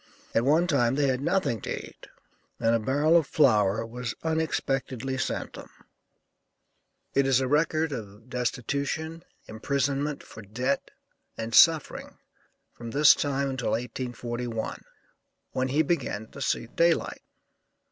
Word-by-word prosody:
At 115 - +2
one 155 +5 +4
time 130 -7 +2
they 140 -1 +2
had 130 0 0
nothing 140 - 0
to - - -3
eat, - - -16 0.5
and 115 -1 +2
a 115 - +3
barrel 145 +8 +2
of 165 -4 +4
flour 110 -7 +3
was 120 0 -5
unexpectedly 135 -5 -1
sent 130 - -3
them." - - -10 1.4
It 140 0 +3
is 135 -1 +4
a 130 - 0
record 155 +2 +1
of 110 -2 -8
destitution, 140 +6 -3 0.2
imprisonment 140 +5 -1
for 115 - -12
debt, 125 +7 -2 0.5
and 115 0 -5
suffering 160 +2 +4 0.6
from 120 -1 -8
this 145 +4 +7
time 140 -1 -1
until 130 -2 -2
1841, 120 -1 -4 0.7
when 130 0 -1
he 145 +4 +2
began 130 -9 -2
to 140 - -10
see - - 0
day 165 +8 +3
light. - - -7
130 Hz, 135 wpm, -27 LUFS, 115-145 Hz, 1.4 s, this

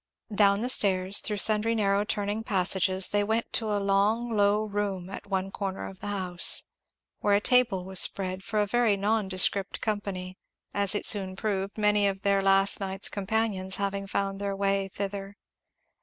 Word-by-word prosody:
Down 200 0 +3
the 250 - -1
stairs, 190 -4 +3
through 210 - -2
sundry 215 +2 +3
narrow 200 -2 +1
turning 205 0 -3
passages, 190 -2 +2
they 205 0 0
went 220 +2 -2
to 220 -2 +1
a 205 - 0
long 205 +4 0
low 205 +1 +2
room 200 -3 -4
at 200 - -9
one 195 -1 -3
corner 195 -1 -5
of 190 - -12
the - - -8
house; 185 -4 +3 0.6
where 205 -1 +2
a - - +3
table 225 -5 +2
was 190 0 0
spread 185 -1 0
for 215 +2 -4
a 210 - +2
very 225 -1 +1
nondescript 200 -2 0
company, 195 -4 -5 0.3
as 200 0 +1
it - - -1
soon 190 -3 +1
proved, 200 -1 -3
many 210 -1 +2
of 195 0 -4
their 200 -1 +2
last 195 0 +4
night's 195 0 -1
companions 200 -2 -2
having 200 0 -3
found 195 0 -3
their 200 -1 -3
way 195 0 -1
thither. 195 +1 -6
200 Hz, 170 wpm, -27 LUFS, 195-210 Hz, 0.6 s, last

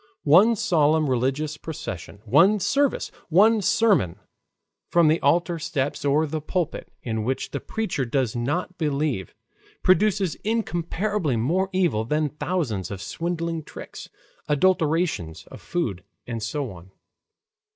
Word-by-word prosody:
One 190 +10 +6
solemn 155 -5 +2
religious 135 +4 -1
procession, 100 - -7
one 170 - +5
service, 280 +8 +1 0.2
one 210 +6 +5
sermon 190 - +2 0.7
from 170 -3 +4
the 160 - +3
altar 170 +3 +2
steps 145 -3 -2
or 145 +2 +3
the 155 +1 -4
pulpit, 170 +1 -3
in 110 -2 -2
which 130 +4 -2
the 140 - -3
preacher 200 -9 -2
does 125 -2 -1
not 165 +10 -2
believe, 140 - -1 0.5
produces 190 -1 +3
incomparably 200 - -1
more 170 +12 0
evil 175 - +1
than 150 +5 0
thousands 140 - -2
of 100 - -6
swindling 165 - -3
tricks, - - -10 0.4
adulteration 160 - +1 0.2
of - - -10
food, 110 - -3 0.2
and 115 -2 -5
so 125 +3 -3
on. 90 0 -13
155 Hz, 125 wpm, -24 LUFS, 130-180 Hz, 0.7 s, One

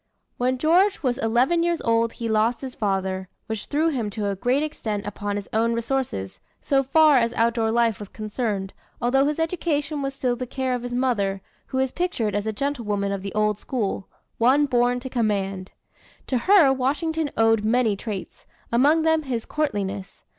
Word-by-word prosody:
When 255 +1 +1
George 350 +7 +3
was 250 -1 0
eleven 250 +9 +2
years 340 -1 +1
old 230 0 +2
he 230 - -4
lost 220 +2 +1
his 260 -2 -6
father, 190 -2 -2 0.2
which 220 -2 -5
threw 310 +3 +1
him 240 -8 -2
to 205 -1 -2
a 200 - -1
great 250 +9 +1
extent 220 -9 -4
upon 205 0 -3
his 205 -1 -4
own 230 +1 +2
resources, 230 - -2 0.2
so 275 -1 +2
far 300 +2 +5
as 235 -1 +2
outdoor 230 -1 +1
life 230 -1 +2
was 205 -2 -8
concerned, 210 -3 -3 0.3
although 270 +3 +3
his 300 - -1
education 315 -3 -1
was 275 0 -3
still 250 -2 0
the 250 +1 -5
care 260 0 -2
of 250 - -2
his 245 0 -4
mother, 200 -7 0 0.2
who 260 - -4
is 265 -1 +1
pictured 265 - -1
as 205 +1 -1
a - - +1
gentlewoman 210 -5 -2
of 200 -1 -3
the 195 +1 -6
old 210 -1 +1
school 210 -6 -3 0.3
one 265 +5 +4
born 245 -2 +2
to 260 - -6
command. 195 -6 -1 0.5
To 255 - 0
her 325 -2 +5
Washington 295 +4 -1
owed 225 -1 +3
many 225 -1 +2
traits, 200 -1 -7 0.2
among 290 +7 +4
them 320 0 +3
his 250 -6 -3
courtliness. 205 -9 -3
240 Hz, 185 wpm, -24 LUFS, 210-275 Hz, 0.5 s, far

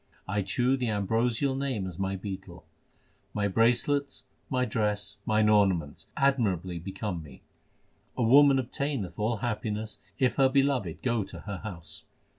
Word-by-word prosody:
I 100 +2 0
chew 125 +7 +1
the 125 -2 -1
ambrosial 115 +6 +1
Name 135 -8 -2
as 90 -2 -7
my 95 0 -1
betel; 95 -3 -7 0.7
My 105 -1 +1
bracelets, 125 +7 +2 0.3
my 125 -1 +1
dress, 105 -2 -1
mine 110 0 +3
ornaments 95 -8 +2
admirably 100 -11 +1
become 95 0 -4
me. 75 -3 -14 0.7
A 125 - +1
woman 140 +4 +7
obtaineth 130 - -3
all 110 +2 0
happiness 110 -1 -3 0.2
if 130 -2 +1
her 135 -1 +5
Beloved 135 - +1
go 120 -4 +1
to 85 -3 -10
her 100 -2 -5
house. 85 -7 -8
105 Hz, 140 wpm, -28 LUFS, 95-125 Hz, 0.7 s, woman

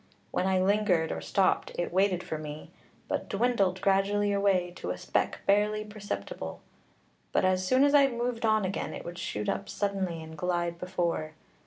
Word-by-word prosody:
When 185 - 0
I 190 -1 +3
lingered 190 -4 +2
or - - -3
stopped, 195 -2 +1
it 175 0 -2
waited 185 -1 +2
for 155 - -4
me, 150 0 -8 0.4
but - - -2
dwindled 200 -4 +1
gradually 200 +1 +2
away 195 -3 +2
to - - -5
a - - -2
speck - - -1
barely 210 +1 +2
perceptible. 210 -1 -6 0.7
But - - +2
as 185 0 +2
soon 255 +5 +4
as 285 0 +4
I 280 -1 +7
moved 240 -1 -2
on 215 -2 +3
again, 185 - -3
it - - -8
would 175 +1 -7
shoot 105 0 -3
up 200 - -2
suddenly 190 -5 -2
and 160 0 -10
glide 175 0 -1
before. 170 -3 -2
195 Hz, 175 wpm, -29 LUFS, 175-210 Hz, 0.7 s, I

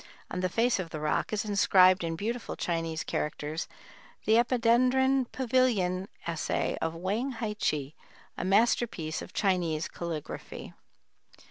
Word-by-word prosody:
On 180 - -3
the 185 0 0
face 230 +3 +2
of 180 -3 -4
the 155 - -5
rock 150 0 0
is 215 0 -1
inscribed 185 -3 +5
in 165 -1 -2
beautiful 230 +7 -3
Chinese 165 -2 -2
characters 150 +1 -3 0.6
the 220 - +3
Epidendron 255 +2 +3
Pavilion 230 -8 +1 0.2
Essay 165 -2 -1
of 165 0 -1
Wang 210 +10 -2
Hi 225 -2 -3
che, 150 -8 -1 0.4
a - - -4
masterpiece 195 -5 +1
of - - -9
Chinese 175 -5 0
calligraphy. 165 -3 -6
190 Hz, 130 wpm, -29 LUFS, 165-235 Hz, 0.6 s, inscribed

